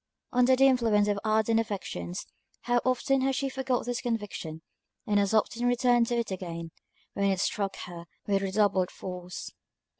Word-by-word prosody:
Under 250 Hz, +1 st, +5 dB
the 270 Hz, +1 st, +5 dB
influence 230 Hz, -6 st, +4 dB
of 205 Hz, -1 st, +1 dB
ardent 220 Hz, +1 st, +2 dB
affections, 140 Hz, -, -4 dB, 0.4 s
how 240 Hz, 0 st, +1 dB
often 260 Hz, +1 st, +2 dB
has 265 Hz, 0 st, +1 dB
she 275 Hz, +1 st, -1 dB
forgot 265 Hz, -1 st, -1 dB
this 245 Hz, 0 st, -2 dB
conviction, 205 Hz, -9 st, -4 dB, 0.4 s
and 205 Hz, -1 st, +2 dB
as 200 Hz, -1 st, +1 dB
often 230 Hz, +2 st, +1 dB
returned 245 Hz, -1 st, +3 dB
to 240 Hz, -, 0 dB
it 230 Hz, -4 st, -2 dB
again, 170 Hz, -3 st, -5 dB, 0.4 s
when 200 Hz, 0 st, +1 dB
it 190 Hz, -2 st, 0 dB
struck 200 Hz, 0 st, -1 dB
her 170 Hz, -1 st, -9 dB, 0.2 s
with 200 Hz, -1 st, +1 dB
redoubled 195 Hz, -1 st, +2 dB
force. 180 Hz, -1 st, -7 dB
215 Hz, 160 wpm, -28 LUFS, 190-245 Hz, 0.4 s, Under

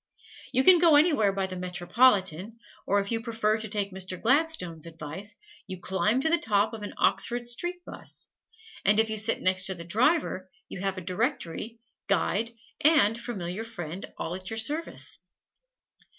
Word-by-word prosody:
You 260 Hz, -, +2 dB
can 365 Hz, +1 st, +8 dB
go 330 Hz, -3 st, +6 dB
anywhere 290 Hz, -, +4 dB
by 195 Hz, 0 st, -1 dB
the 185 Hz, -1 st, -6 dB
"Metropolitan," 185 Hz, +2 st, +1 dB, 0.3 s
or 205 Hz, -, +3 dB
if 200 Hz, +2 st, -3 dB
you 225 Hz, 0 st, -1 dB
prefer 225 Hz, -2 st, 0 dB
to 220 Hz, -, -3 dB
take 200 Hz, -1 st, -1 dB
Mr. 185 Hz, -1 st, -2 dB
Gladstone's 235 Hz, -, 0 dB
advice, 165 Hz, +5 st, -6 dB, 0.3 s
you 185 Hz, -2 st, -7 dB
climb 205 Hz, +7 st, 0 dB
to 320 Hz, -, +1 dB
the 340 Hz, -, +3 dB
top 210 Hz, 0 st, +1 dB
of 220 Hz, -, -7 dB
an 205 Hz, -, -7 dB
Oxford 240 Hz, 0 st, +1 dB
Street 350 Hz, +9 st, -1 dB
bus, -, -, -9 dB, 0.6 s
and 210 Hz, +2 st, +4 dB
if 220 Hz, 0 st, +2 dB
you 215 Hz, -, 0 dB
sit 215 Hz, +2 st, 0 dB
next 185 Hz, 0 st, +4 dB
the 190 Hz, -, -2 dB
driver 215 Hz, -, +1 dB, 0.2 s
you -, -, -8 dB
have 195 Hz, 0 st, -2 dB
a -, -, -4 dB
directory, 215 Hz, -, -3 dB, 0.3 s
guide 210 Hz, +2 st, +1 dB, 0.3 s
and 285 Hz, -9 st, +5 dB
familiar 215 Hz, -4 st, -4 dB
friend 185 Hz, -6 st, -7 dB
all 165 Hz, -, -4 dB
at 185 Hz, +1 st, -4 dB
your 225 Hz, -, -4 dB
service. 295 Hz, +9 st, -1 dB
210 Hz, 165 wpm, -27 LUFS, 185-240 Hz, 0.6 s, can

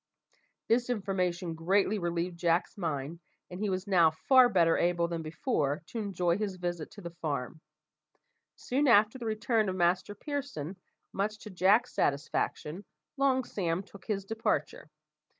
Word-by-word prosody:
This 240 Hz, +2 st, +2 dB
information 185 Hz, -6 st, -1 dB
greatly 195 Hz, +5 st, +1 dB
relieved 170 Hz, 0 st, -2 dB
Jack's 170 Hz, +3 st, +1 dB
mind, 160 Hz, -4 st, -3 dB, 0.3 s
and 180 Hz, -, -7 dB
he 210 Hz, 0 st, -1 dB
was 185 Hz, 0 st, -2 dB
now 180 Hz, -5 st, +5 dB
far 250 Hz, -, +5 dB
better 170 Hz, -6 st, +4 dB
able 170 Hz, -1 st, +1 dB
than 170 Hz, -1 st, -3 dB
before 155 Hz, -, -1 dB
to 235 Hz, -, -4 dB
enjoy 185 Hz, -3 st, 0 dB
his 205 Hz, -3 st, -2 dB
visit 175 Hz, -3 st, -4 dB
to 205 Hz, -, -11 dB
the 170 Hz, -2 st, -7 dB
farm. 145 Hz, 0 st, -3 dB, 0.9 s
Soon 280 Hz, +3 st, 0 dB
after 220 Hz, +2 st, +5 dB
the 235 Hz, -, -4 dB
return 220 Hz, -1 st, +1 dB
of 185 Hz, -, -2 dB
Master 180 Hz, +3 st, +1 dB
Pearson, 270 Hz, -, -5 dB, 0.4 s
much 210 Hz, +2 st, -1 dB
to 215 Hz, 0 st, -10 dB
Jack's 190 Hz, +6 st, +3 dB
satisfaction, 150 Hz, +4 st, -1 dB, 0.3 s
Long 270 Hz, -2 st, +2 dB
Sam 180 Hz, -5 st, -2 dB
took 200 Hz, 0 st, -15 dB
his 200 Hz, -3 st, -2 dB
departure. 225 Hz, -, -2 dB
185 Hz, 150 wpm, -30 LUFS, 170-215 Hz, 0.9 s, now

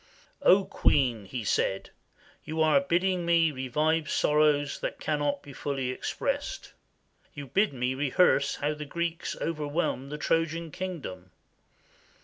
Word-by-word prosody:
"O 195 Hz, -7 st, +5 dB
Queen," 125 Hz, -7 st, +1 dB
he 120 Hz, +4 st, -5 dB
said, 95 Hz, -1 st, 0 dB, 0.5 s
"you 160 Hz, +1 st, -5 dB
are 155 Hz, -3 st, +5 dB
bidding 175 Hz, +5 st, +1 dB
me 170 Hz, -1 st, +3 dB
revive 150 Hz, +4 st, 0 dB
sorrows 150 Hz, -1 st, +2 dB
which -, -, -2 dB
cannot 145 Hz, -2 st, -1 dB
be 140 Hz, -, -11 dB
fully 135 Hz, -3 st, -2 dB
expressed. 130 Hz, -, -3 dB, 0.6 s
You 145 Hz, -, -6 dB
bid 200 Hz, -, +1 dB
me 125 Hz, -1 st, -1 dB
rehearse 140 Hz, +1 st, +2 dB
how 145 Hz, +1 st, -1 dB
the 150 Hz, 0 st, -7 dB
Greeks 170 Hz, +3 st, -3 dB
overwhelmed 150 Hz, -3 st, -2 dB
the 150 Hz, -, -4 dB
Trojan 165 Hz, +1 st, -1 dB
king 185 Hz, -2 st, -5 dB
dom. 90 Hz, -5 st, -8 dB
150 Hz, 130 wpm, -28 LUFS, 135-165 Hz, 0.6 s, O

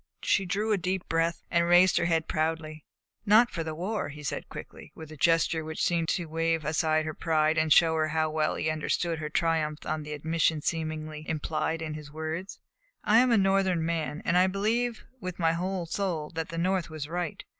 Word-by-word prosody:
She 195 Hz, -2 st, +2 dB
drew 210 Hz, +4 st, -1 dB
a 205 Hz, -, +2 dB
deep 185 Hz, +1 st, -2 dB
breath 165 Hz, +1 st, 0 dB
and 170 Hz, -1 st, +2 dB
raised 175 Hz, +1 st, +6 dB
her 170 Hz, -, +2 dB
head 165 Hz, -2 st, +1 dB
proudly. 155 Hz, -1 st, -2 dB, 0.4 s
"Not 225 Hz, +3 st, +5 dB
for 165 Hz, -, -3 dB
the 160 Hz, -1 st, -5 dB
war," 185 Hz, 0 st, -3 dB
he 150 Hz, +1 st, -10 dB
said 135 Hz, -, -4 dB
quickly, -, -, -10 dB
with 160 Hz, -1 st, -10 dB
a -, -, -8 dB
gesture 165 Hz, +2 st, +2 dB
which 160 Hz, 0 st, -4 dB
seemed 170 Hz, -2 st, +1 dB
to 175 Hz, -, 0 dB
wave 165 Hz, 0 st, -1 dB
aside 155 Hz, 0 st, +1 dB
her 155 Hz, -, -3 dB
pride 155 Hz, -1 st, +1 dB
and 155 Hz, 0 st, +1 dB
showed 160 Hz, +1 st, +6 dB
her 155 Hz, 0 st, +1 dB
how 155 Hz, 0 st, 0 dB
well 155 Hz, 0 st, 0 dB
he -, -, -3 dB
had 155 Hz, -, +1 dB
understood 165 Hz, +1 st, -1 dB
her 155 Hz, -1 st, -4 dB
triumph 155 Hz, -2 st, 0 dB
at 155 Hz, 0 st, -2 dB
the 150 Hz, 0 st, -6 dB
admission 160 Hz, +1 st, +1 dB
seemingly 155 Hz, -2 st, -3 dB
implied 160 Hz, +1 st, -2 dB
in 155 Hz, -1 st, -4 dB
his 150 Hz, -1 st, -9 dB
words. 160 Hz, +5 st, -5 dB, 0.5 s
"I 220 Hz, +2 st, +5 dB
am 255 Hz, +1 st, +4 dB
a 230 Hz, -, +5 dB
Northern 195 Hz, -4 st, +2 dB
man, 160 Hz, -2 st, -2 dB
and 175 Hz, +1 st, +3 dB
I 185 Hz, -, +5 dB
believe 225 Hz, +5 st, -1 dB
with 185 Hz, -4 st, -6 dB
my 165 Hz, -2 st, +2 dB
whole 180 Hz, +1 st, -2 dB
soul 165 Hz, -4 st, -2 dB
that 165 Hz, -1 st, -4 dB
the 165 Hz, -, -6 dB
North 185 Hz, 0 st, 0 dB
was 155 Hz, -2 st, -6 dB
right. 175 Hz, 0 st, -4 dB
165 Hz, 210 wpm, -28 LUFS, 155-180 Hz, 0.5 s, raised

